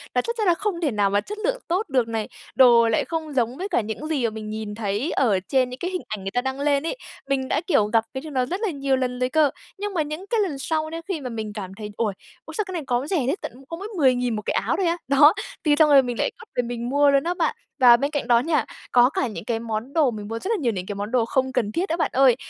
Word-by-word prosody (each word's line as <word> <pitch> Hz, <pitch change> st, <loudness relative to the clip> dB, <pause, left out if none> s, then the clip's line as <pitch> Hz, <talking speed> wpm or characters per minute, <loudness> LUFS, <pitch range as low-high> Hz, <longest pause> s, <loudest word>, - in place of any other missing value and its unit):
là -, -, +4 dB
chắc 470 Hz, 0 st, -3 dB
chắn 430 Hz, -, 0 dB
là 350 Hz, -, +6 dB
không 390 Hz, -4 st, -2 dB
thể 295 Hz, -6 st, +1 dB
nào 205 Hz, -2 st, +2 dB
mà 205 Hz, +1 st, +2 dB
chất 420 Hz, +1 st, -7 dB
lượng -, -, 0 dB
tốt 360 Hz, +1 st, -1 dB
được 250 Hz, -4 st, +2 dB
này, 225 Hz, -2 st, -2 dB, 0.3 s
đồ 235 Hz, -3 st, +6 dB
lại 220 Hz, -, +1 dB
không 320 Hz, -3 st, -4 dB
giống 245 Hz, 0 st, 0 dB
với 390 Hz, +3 st, -4 dB
cả -, -, +2 dB
những 220 Hz, +8 st, -5 dB
gì 290 Hz, -6 st, -1 dB
mà 230 Hz, -, +2 dB
mình 215 Hz, -1 st, -7 dB
nhìn 215 Hz, -1 st, -5 dB
thấy 215 Hz, -, -2 dB
ở 215 Hz, -8 st, +2 dB
trên 255 Hz, +6 st, +1 dB
những 250 Hz, -, -8 dB
cái 360 Hz, +2 st, -3 dB
hình 365 Hz, -, -3 dB
ảnh 210 Hz, -3 st, -5 dB
người 195 Hz, -, -4 dB
ta 245 Hz, -, 0 dB
đăng 265 Hz, +1 st, -3 dB
lên 285 Hz, 0 st, +2 dB
ấy. -, -, -3 dB, 0.3 s
Mình 265 Hz, -1 st, 0 dB
đã, 300 Hz, -, 0 dB
kiểu, 215 Hz, -, +4 dB
gặp 225 Hz, +1 st, +2 dB
cái 265 Hz, -, -4 dB
điều 310 Hz, -1 st, -8 dB
nó 255 Hz, -2 st, +1 dB
rất 370 Hz, -, -4 dB
là 435 Hz, -, +1 dB
nhiều 275 Hz, -2 st, 0 dB
lần 250 Hz, -1 st, -2 dB
rồi 250 Hz, 0 st, +1 dB
cơ, 305 Hz, 0 st, +4 dB, 0.3 s
nhưng 410 Hz, 0 st, -4 dB
mà 330 Hz, -, +1 dB
những 305 Hz, +5 st, -5 dB
cái 460 Hz, -, +1 dB
lần 325 Hz, -9 st, -1 dB
sau 315 Hz, +2 st, -1 dB
đấy 330 Hz, +1 st, -5 dB
khi 340 Hz, -7 st, -3 dB
mà 250 Hz, -, -4 dB
mình 220 Hz, -2 st, -5 dB
cảm 190 Hz, -3 st, -6 dB
thấy, 210 Hz, -1 st, -6 dB
ôi, 215 Hz, -4 st, 0 dB, 0.3 s
ui, -, -, -9 dB
sao 425 Hz, -, 0 dB
cái -, -, -5 dB
này 330 Hz, -4 st, -3 dB
có 250 Hz, +3 st, 0 dB
rẻ 375 Hz, -, +1 dB
thế, 290 Hz, -, +1 dB
tận -, -, -5 dB, 0.2 s
có 330 Hz, -, -5 dB
mỗi 400 Hz, +3 st, -6 dB
10 260 Hz, -5 st, +4 dB
nghìn 245 Hz, -2 st, -1 dB
một 210 Hz, -, -3 dB
cái -, -, 0 dB
áo -, -, 0 dB
thôi 380 Hz, -, +1 dB
á. 335 Hz, -, +1 dB
Đó, 290 Hz, +4 st, +7 dB, 0.3 s
thì 300 Hz, -2 st, +4 dB
xong 305 Hz, -1 st, +6 dB
rồi 275 Hz, -2 st, +7 dB
mình 245 Hz, -2 st, -4 dB
lại -, -, +2 dB
cắt -, -, -10 dB
về 245 Hz, -, +1 dB
mình 240 Hz, 0 st, -4 dB
mua 285 Hz, +1 st, +4 dB
luôn 275 Hz, 0 st, +3 dB
á 350 Hz, +1 st, 0 dB
bạn. -, -, 0 dB, 0.2 s
Và 240 Hz, -2 st, +8 dB
bên 280 Hz, +4 st, -1 dB
cạnh 290 Hz, -5 st, -2 dB
đó 235 Hz, -1 st, +5 dB
nha, 300 Hz, +2 st, +1 dB, 0.3 s
có 245 Hz, +1 st, +6 dB
cả 260 Hz, -, -1 dB
những 215 Hz, -1 st, -7 dB
cái 230 Hz, -2 st, -1 dB
món 225 Hz, +3 st, -4 dB
đồ 300 Hz, -7 st, +3 dB
mình 210 Hz, -2 st, -7 dB
mua 225 Hz, +1 st, -4 dB
rất 390 Hz, -, -5 dB
là -, -, +3 dB
nhiều 240 Hz, -3 st, +2 dB
này, 185 Hz, -3 st, -4 dB
cái 205 Hz, -, -4 dB
món 205 Hz, +3 st, -4 dB
đồ 245 Hz, -3 st, +2 dB
không 260 Hz, +2 st, 0 dB
cần 210 Hz, -3 st, 0 dB
thiết 360 Hz, -, -1 dB
đó 330 Hz, -, 0 dB
bạn 330 Hz, -, 0 dB
ơi, 260 Hz, -2 st, +5 dB
265 Hz, 315 wpm, -23 LUFS, 230-315 Hz, 0.3 s, Và